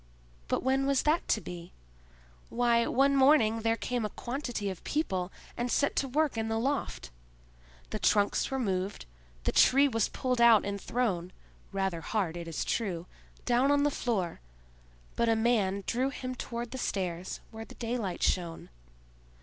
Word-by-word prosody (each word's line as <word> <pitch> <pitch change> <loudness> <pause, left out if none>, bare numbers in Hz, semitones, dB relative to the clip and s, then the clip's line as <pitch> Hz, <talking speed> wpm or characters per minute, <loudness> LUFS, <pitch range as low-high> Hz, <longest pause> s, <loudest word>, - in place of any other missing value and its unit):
But - - -1
when 265 +1 +2
was 275 -1 +2
that 310 +3 +1
to - - +2
be? 175 -1 -9 0.8
Why, 235 -1 +2
one 275 +2 +3
morning 265 -5 +5
there 225 0 +2
came 245 -1 -2
a 210 - -1
quantity 245 -3 -4
of 185 - -10
people 190 - -1 0.2
and 240 0 -2
set 285 - +1
to 275 - +1
work 290 -2 0
in 225 - -1
the 225 0 -1
loft. 265 - -2 0.8
The - - -3
trunks 205 -1 +2
were 270 - -2
moved, 195 -5 -2 0.4
the - - +1
tree 275 +2 +5
was 225 -5 0
pulled 250 -2 -1
out 230 -3 +7
and 200 -1 -3
thrown—rather 190 -4 -3
hard, 185 -4 -1
it 170 -1 -6
is 165 - -3
true—down 230 +6 -1
on 285 0 +3
the 290 - +2
floor, 205 -11 -2 0.8
but 235 0 +2
a 225 - +4
man 215 -4 +1
drew 255 +3 0
him 255 -1 -5
toward 240 -1 -5
the 260 - -5
stairs, 185 -5 -3
where 220 0 -7
the - - -13
daylight 230 -6 -3
shone. 170 -3 -1
230 Hz, 160 wpm, -30 LUFS, 195-255 Hz, 0.8 s, out